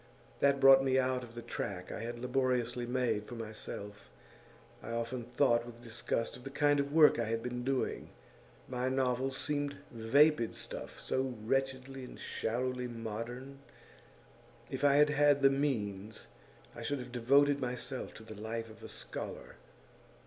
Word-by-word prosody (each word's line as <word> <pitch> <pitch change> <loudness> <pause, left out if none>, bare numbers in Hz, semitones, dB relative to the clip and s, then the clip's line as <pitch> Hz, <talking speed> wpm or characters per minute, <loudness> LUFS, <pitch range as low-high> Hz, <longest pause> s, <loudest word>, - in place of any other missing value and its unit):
That 140 0 +4
brought 135 0 +8
me 130 -1 +2
out 130 -1 +1
of 120 -1 -11
the 120 - -6
track 90 -2 -4
I - - -5
had 120 +2 -4
laboriously 125 -1 0
made 120 -4 0
for 120 - -7
myself 105 - -7 0.7
I - - -8
often 115 +1 -2
thought 120 0 +2
with 120 -1 -11
disgust 115 0 -2
of 125 - -12
the 135 - -6
kind 145 +1 +3
of 140 0 -1
work 150 -4 +6
I 115 - +1
had 115 +1 -2
been 125 0 -3
doing; 135 0 -1 0.6
my 125 0 -1
novels 130 0 0
seemed 145 -1 -1
vapid 120 +2 +3
stuff, - - -6
so 130 -1 -1
wretchedly 135 +1 -1
and 125 - -10
shallowly 125 +2 -2
modern. 120 +4 -6 1.1
If - - -4
I 140 -1 +6
had 150 +1 +6
had 145 -1 +4
the 135 - +7
means, 110 -7 -2 0.5
I - - -7
should 145 -1 -1
have 125 -1 -7
devoted 140 +4 +4
myself 125 0 -4
to 110 - -10
the 110 - -9
life 110 +2 -5
of 110 - -15
a - - -9
scholar. - - -7
125 Hz, 160 wpm, -33 LUFS, 115-135 Hz, 1.1 s, brought